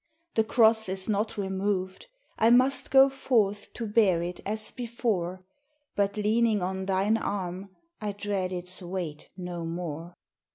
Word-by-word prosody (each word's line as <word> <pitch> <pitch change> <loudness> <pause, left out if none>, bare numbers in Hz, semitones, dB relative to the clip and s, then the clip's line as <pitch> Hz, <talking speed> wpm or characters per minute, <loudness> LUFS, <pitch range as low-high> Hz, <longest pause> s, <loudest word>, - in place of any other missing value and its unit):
The 220 - +3
cross 220 -2 +4
is 190 0 -3
not 215 +1 -1
removed, 190 - -2 0.3
I 225 - +5
must 255 +2 +3
go 270 0 +7
forth 225 -7 0
to 235 - -4
bear 205 -5 +3
it 175 0 -5
as 215 +1 0
before, 210 -7 -2 0.5
But, 200 +1 0
leaning 215 -1 +2
on 190 +1 -3
thine 195 +3 +2
arm, 190 -2 -4 0.3
I 210 -1 -2
dread 200 -2 -2
its 180 +1 0
weight 175 -4 -5
no 180 -2 -5
more. 165 0 -5
200 Hz, 140 wpm, -28 LUFS, 185-220 Hz, 0.5 s, go